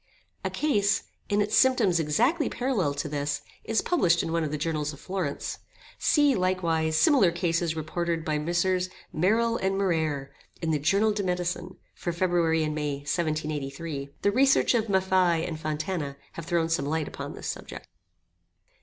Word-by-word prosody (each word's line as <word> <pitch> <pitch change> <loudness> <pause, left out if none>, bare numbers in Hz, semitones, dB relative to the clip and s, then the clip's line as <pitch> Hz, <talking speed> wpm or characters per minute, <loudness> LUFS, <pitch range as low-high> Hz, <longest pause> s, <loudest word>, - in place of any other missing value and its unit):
[*] - - -36
* - - -42
A - - -1
case, 205 -10 +1 0.3
in 205 0 +3
its 210 - -1
symptoms 230 -10 +4
exactly 240 - +2
parallel 225 - 0
to 145 - -3
this, 145 0 -2 0.2
is 225 - 0
published 175 - +3
in 165 - -3
one 165 0 +1
of 155 - -1
the 150 - -2
Journals 150 -1 -2
of 140 - -12
Florence. 180 -5 -3 0.4
See, 290 -2 +4
likewise, 170 -5 +1
similar 250 - +5
cases 170 -1 0
reported 165 +1 -2
by 155 -1 0
Messrs. 180 +3 0 0.2
Merille 225 +8 +2
and 195 0 0
Muraire, 160 -8 0 0.3
in 165 -1 -1
the 150 - +1
"Journal 200 +9 +3
de 205 -1 -1
Medicine," 180 -1 -2 0.2
for 175 - -3
February 170 -2 +1
and 155 0 -1
May, 145 -2 -2
1783. 150 -1 -3
The 200 - +4
researches 260 -1 +4
of - - -11
Maffei 185 -3 +2
and 160 -2 -5
Fontana 155 -2 -3
have 165 -1 -8
thrown 170 -1 +1
some 165 -3 0
light 155 0 -1
upon - - -7
this - - -9
subject. - - -6
170 Hz, 170 wpm, -27 LUFS, 155-195 Hz, 0.4 s, similar